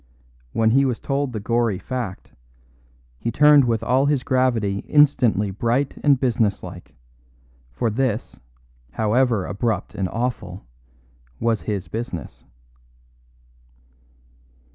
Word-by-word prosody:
When 110 - +2
he 135 +3 +4
was 125 -4 -1
told 140 -1 -2
the 110 - -4
gory 115 -1 0
fact, 120 -3 -6 0.9
he - - -2
turned 150 +1 +6
with 115 -2 0
all 130 +4 +2
his 145 -3 +1
gravity 120 -7 +1
instantly 125 -9 +3
bright 120 +7 -1
and 140 -3 +4
businesslike; 115 -6 -2 0.8
for 110 - -1
this, 120 -1 -2 0.5
however 110 -1 +1
abrupt 110 0 -2
and 95 -2 -2
awful, 110 -6 -4 0.7
was 115 -2 0
his 100 -4 -4
business. 110 - -6
115 Hz, 105 wpm, -22 LUFS, 105-130 Hz, 0.9 s, turned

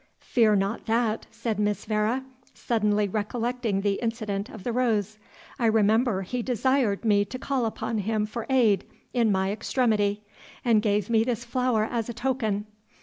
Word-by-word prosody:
"Fear 220 -4 +3
not 200 +4 -1
that," 225 -1 0
said 220 -3 -3
Miss 210 0 0
Vere, 215 +4 0 0.3
suddenly 210 -3 +1
recollecting 225 +1 -1
the 200 -1 0
incident 215 -4 -2
of 215 - -10
the 240 - -1
rose; 215 -4 0 0.4
"I 235 - +3
remember 220 -1 +3
he 245 +6 -3
desired 245 -3 +1
me 205 -2 +4
to 245 +6 -6
call 260 -2 -1
upon 220 0 -3
him 210 +1 0
for 220 +1 -6
aid 235 -7 +3 0.3
in 235 -4 +3
my 190 0 +1
extremity, 210 -2 0 0.4
and 225 -3 +4
gave 210 -2 +1
me 225 -1 +4
this 235 -1 -2
flower 245 -2 +1
as 230 +1 -2
a 235 - -5
token. 230 -5 -1
220 Hz, 160 wpm, -26 LUFS, 210-240 Hz, 0.4 s, me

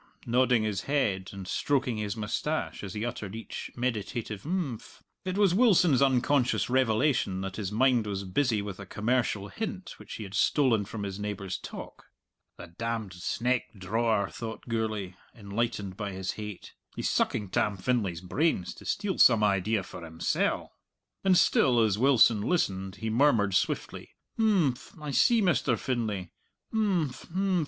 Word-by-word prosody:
nodding 125 -1 +3
his 105 -3 -1
head 100 -10 0
and 95 -2 -8
stroking 130 -3 0
his 105 0 -3
moustache 110 +9 -2
as 95 -1 -6
he 105 +2 -2
uttered 110 -4 -5
each 115 - -6
meditative 115 -3 -3
"imphm." 155 - -4 0.3
It 185 +1 -2
was 200 -4 +4
Wilson's 180 - +5
unconscious 130 -1 +2
revelation 120 -5 +2
that 95 -1 -5
his 100 -3 -3
mind 120 0 +3
was 100 -1 -3
busy 105 +2 0
with 100 -2 -6
a 95 - -8
commercial 105 -1 0
hint 195 - -6
which - - -9
he 110 - -6
had 95 -1 -9
stolen 115 -2 +3
from 105 0 -6
his 100 0 -5
neighbour's 100 -3 -4
talk. - - -9 0.5
"The - - -8
damned 110 +4 -4
sneck 120 +6 -1
drawer!" 110 +2 +1
thought 115 -1 -7
Gourlay, 110 -5 -2 0.2
enlightened 100 -3 -3
by 105 -3 -4
his 95 0 -3
hate; 105 -3 -8 0.2
"he's - - -2
sucking 105 -3 0
Tam 105 +1 0
Finlay's 95 -5 -1
brains, 95 - 0
to - - -14
steal 195 -3 -1
some 115 -4 +6
idea 100 +1 +2
for 90 - -10
himsell!" 80 0 -1 0.5
And 190 -2 +5
still 125 -7 +4
as 110 -3 +2
Wilson 120 -5 +5
listened 95 - 0
he 110 +1 -3
murmured 115 -6 +3
swiftly, 95 - -2 0.2
"Imphm! 180 - +1
I 150 -1 -5
see, 230 - +4
Mr. 145 -9 +2
Finlay; 105 -9 -2 0.4
imphm! 190 -10 +1
110 Hz, 150 wpm, -28 LUFS, 100-130 Hz, 0.5 s, some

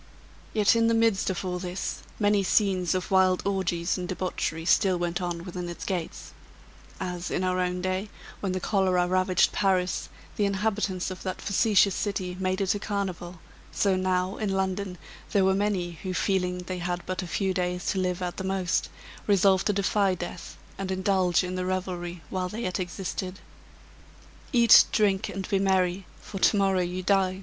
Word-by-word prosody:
Yet 215 0 +4
in 230 0 +3
the 230 - +3
midst 225 -4 +2
of 190 0 -3
all 180 -1 -2
this, 180 +1 -4 0.2
many 205 -1 +3
scenes 190 -2 +2
of 185 +1 -3
wild 185 -1 +3
orgies 185 -3 0
and 180 - -4
debauchery 175 -3 -3
still 185 +1 +3
went 175 +1 -2
on 175 -1 -3
within 180 -1 -5
its 175 - -7
gates 180 -4 -4 0.7
as, 180 -2 -4
in 185 - -1
our 185 0 0
own 180 0 -1
day, 185 +2 -1 0.3
when 195 - -2
the 185 - -1
cholera 185 -2 +2
ravaged 185 0 +3
Paris, 185 -3 0 0.3
the 205 - +2
inhabitants 200 -2 -1
of 185 - -7
that 185 -1 -4
facetious 200 -1 +3
city 185 -3 -2
made 185 +1 0
it 190 - +2
a 205 - -3
carnival, 185 -4 -4 0.3
so 195 -2 +2
now, 185 0 0
in 215 - -2
London, 190 -1 -2 0.4
they 200 - +4
were 190 0 +4
many 195 -3 0
who, 185 -1 -4
feeling 180 -2 0
they 185 0 -5
had 175 0 -3
but 185 0 -3
a 180 - -6
few 190 +2 0
days 180 -1 -2
to 195 - -1
live 180 -1 -1
at 175 -1 -4
the 190 - -4
most, 190 -1 0 0.4
resolved 195 -1 +4
to 210 - +2
defy 200 -1 +2
death, 175 -1 -7 0.2
and 195 -1 -3
indulge 185 -1 +2
in 180 0 -4
the 185 0 -2
revelry 180 -2 -3
while 185 -1 -2
they 220 +5 -5
yet 185 +1 -2
existed. 185 +1 -4 1.1
"Eat, 235 -4 +8
drink, 200 -1 +2
and 195 -1 -5
be 195 - +1
merry, 190 -1 +1
for 195 - -7
to 205 - +4
morrow 195 -2 +2
you 180 +1 -3
die!" 190 -1 +2
185 Hz, 180 wpm, -27 LUFS, 180-195 Hz, 1.1 s, Eat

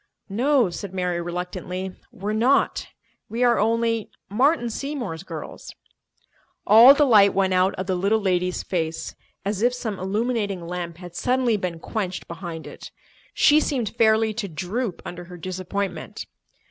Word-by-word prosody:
"No," 245 0 +2
said 190 +2 -7
Mary 180 -2 -1
reluctantly, 180 +2 -4 0.2
"we're 210 -2 -4
not. 245 +6 +2 0.4
We 230 +3 -1
are 240 -1 +4
only—Martin 230 +4 0
Seymour's 240 - -4
girls." 165 -5 -8 0.9
All 230 +6 +9
the 295 - +4
light 205 -6 +6
went 190 -1 +2
out 185 +1 +2
of 185 - -4
the 185 - -1
little 200 +5 +2
lady's 180 -2 0
face, 165 -3 -3 0.3
as 200 0 -2
if 245 +2 +3
some 220 -5 -4
illuminating 205 -2 -1
lamp 170 -1 -5
had 175 -1 -11
suddenly 250 0 +1
been 180 -4 -3
quenched 185 +1 -4
behind 170 -1 -7
it. - - -10 0.5
She 300 0 +6
seemed 255 -8 -1
fairly 220 0 +3
to 210 -2 -3
droop 190 +5 -4
under 175 0 -7
her 180 0 -10
disappointment. 185 0 -4
200 Hz, 145 wpm, -24 LUFS, 180-230 Hz, 0.9 s, All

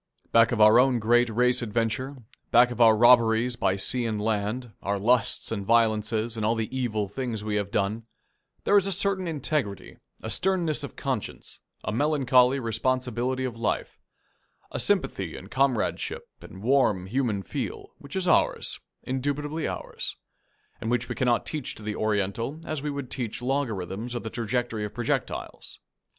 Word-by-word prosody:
Back 115 0 +5
of 120 - -1
our 110 +2 +7
own 130 -1 +4
great 120 +2 +3
race 125 +3 +2
adventure, 120 +4 -2 0.3
back 120 +1 +5
of 120 - -3
our 110 -2 +7
robberies 120 0 +5
by 95 -4 +1
sea 120 +5 +1
and 110 -2 -2
land, 110 +3 -2
our 100 +1 -1
lusts 115 +4 +1
and 105 -3 -2
violences 110 +1 +1
and 110 - -3
all 110 +2 +2
the 115 +3 -3
evil 110 -5 -1
things 115 -2 -4
we 105 -1 -3
have 100 -1 -2
done, 105 +4 -1 0.6
there 205 - +3
is 200 -1 +3
a - - -1
certain 190 -1 0
integrity, 145 - -3 0.3
a - - -4
sternness 170 -6 0
of 140 - -7
conscience, - - -4 0.2
a - - -2
melancholy 130 0 +3
responsibility 125 +2 -1
of 120 -3 -5
life, 110 - -2 0.7
a - - -3
sympathy - - +1
and - - -11
comradeship 130 -4 0 0.2
and 95 - -11
warm 115 -8 +3
human 110 -2 -1
feel, - - -5
which 140 +4 -10
is 190 -1 -1
ours, - - +2 0.2
indubitably 145 +4 -2
ours, - - -4 0.7
and 110 - -3
which 120 0 0
we - - -1
cannot 120 -2 +1
teach 150 -5 -3
to 110 - -12
the 105 0 -3
Oriental 110 +7 -1
as 155 -3 -3
we 150 - -3
would 140 -3 -5
teach 120 -5 -3
logarithms 120 -4 -2
or - - -1
the 110 - -6
trajectory 115 -1 -2
of 105 - -6
projectiles. 120 -2 -3
120 Hz, 165 wpm, -26 LUFS, 110-130 Hz, 0.7 s, our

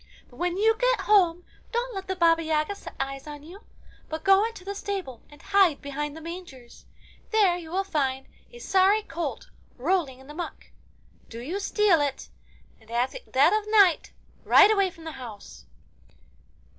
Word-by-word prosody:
But - - -18
when 355 +1 -1
you 445 +2 +3
get - - +2
home, 360 -4 +3 0.3
don't 485 +1 -2
let 385 -1 -6
the 380 - -2
Baba 335 -2 +3
Yaga 315 +3 0
set 400 - -11
eyes 270 +1 -4
on 295 -1 -9
you, 360 +7 -12 0.5
but 315 0 -5
go 390 +1 +5
into 450 -5 -11
the 400 - -4
stable 385 - -5
and 295 - -16
hide 390 -7 +3
behind 290 +1 -5
the - - -9
mangers. 325 -8 -10 0.4
There 410 -5 +3
you 340 -2 -8
will 380 +4 -1
find 270 -7 -2 0.3
a 480 - -12
sorry 395 -1 +3
colt 345 -4 -5 0.3
rolling 290 -1 0
in 265 - -16
the 295 - -11
muck. 345 +3 -7 0.6
Do 230 - -8
you 320 +12 -4
steal 400 -5 +2
it, 280 -2 -3 0.5
and 220 - -22
at 240 +2 0
the - - -9
dead 285 +8 +4
of 425 0 -1
night 400 -6 +4 0.3
ride 410 +1 +7
away 395 -3 +2
from 330 -2 -15
the 320 - -6
house. 220 -5 -11
350 Hz, 180 wpm, -26 LUFS, 290-400 Hz, 0.6 s, ride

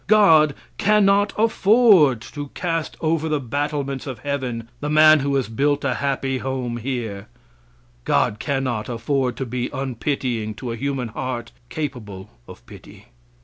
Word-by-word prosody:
God 160 -9 +5 0.2
cannot 205 -1 +3
afford 210 - +4
to 145 +4 -7
cast 165 -3 -2
over 160 0 0
the 150 -1 0
battlements 140 +1 -3
of 130 -3 -5
heaven 125 -3 -4
the 150 - -3
man 155 0 +6
who 140 0 -1
has 135 -5 0
built 140 +6 0
a 135 - +1
happy 135 0 -1
home 125 -3 -3
here. 115 -5 -4 0.8
God 105 - +1
cannot 130 -6 -2
afford 125 +1 -1
to 135 - -3
be 125 0 -3
unpitying 125 -4 -3
to 120 +1 -5
a - - -3
human 135 -1 -3
heart 120 +1 -5 0.2
capable 115 -11 -6 0.2
of - - -13
pity. - - -15
135 Hz, 145 wpm, -22 LUFS, 120-150 Hz, 0.8 s, man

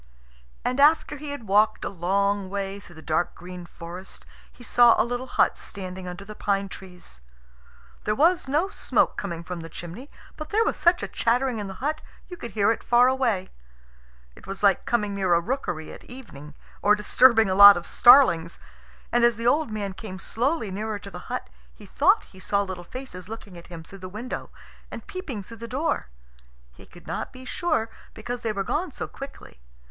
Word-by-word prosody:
And 255 +2 0
after 300 0 +4
he 295 +1 -7
had 285 -5 -6
walked 210 +2 +3
a - - -1
long 200 +2 0
way 200 0 -4
through 175 -4 -16
the 160 - -12
dark 160 +2 -1
green 180 0 -9
forest, 175 +3 -10 0.3
he 245 - -16
saw 240 0 +6
a - - +4
little 245 +2 -4
hut - - +2
standing 185 -1 -6
under 180 +3 -7
the 215 - -8
pine 200 -1 -1
trees. 180 - -11 0.8
There 210 - +1
was 335 +4 +3
no 305 +8 +1
smoke - - +1
coming 170 -4 -5
from 180 0 -6
the 165 0 -8
chimney, 175 - -9 0.3
but 305 0 -7
there 440 +2 +3
was - - 0
such 345 +1 +3
a - - -2
chattering 245 0 0
in 205 - -4
the 190 - -7
hut 310 +1 -1 0.3
you 360 - -8
could 235 - -7
hear 205 0 +3
it 230 - -3
far 245 +1 +5
away. 240 -8 0 0.8
It - - -16
was 195 +1 -6
like 195 -3 +3
coming 210 -4 0
near 190 -3 +2
a - - +4
rookery 170 - -4
at - - -13
evening, 150 - -11 0.3
or 210 +1 +5
disturbing 225 +1 +5
a 190 - 0
lot 200 0 +10
of 175 - -6
starlings. 170 -11 +5 0.5
And 240 0 +3
as 235 -2 +4
the 230 - -5
old 295 +4 +3
man 205 -3 -4
came 190 -1 -8
slowly 235 +3 -1
nearer 215 +2 -3
to 200 0 -11
the 180 -1 -10
hut, - - -3 0.3
he - - -14
thought - - +3
he 190 - -17
saw 200 +1 0
little 185 -2 -6
faces 185 -4 -9
looking 215 -4 -9
at 170 - -12
him 170 -2 -9
through 195 +4 -13
the 185 0 -8
window 220 +6 -6 0.4
and - - -8
peeping 285 - -6
through 230 +4 -12
the 230 - -7
door. 270 - -1 0.6
He - - -17
could - - -16
not - - -4
be 255 0 -12
sure, 230 -8 -1 0.2
because 240 +2 -5
they 225 - -1
were 200 -2 -2
gone 320 - -2
so - - -5
quickly. 275 - -11
210 Hz, 200 wpm, -25 LUFS, 185-250 Hz, 0.8 s, lot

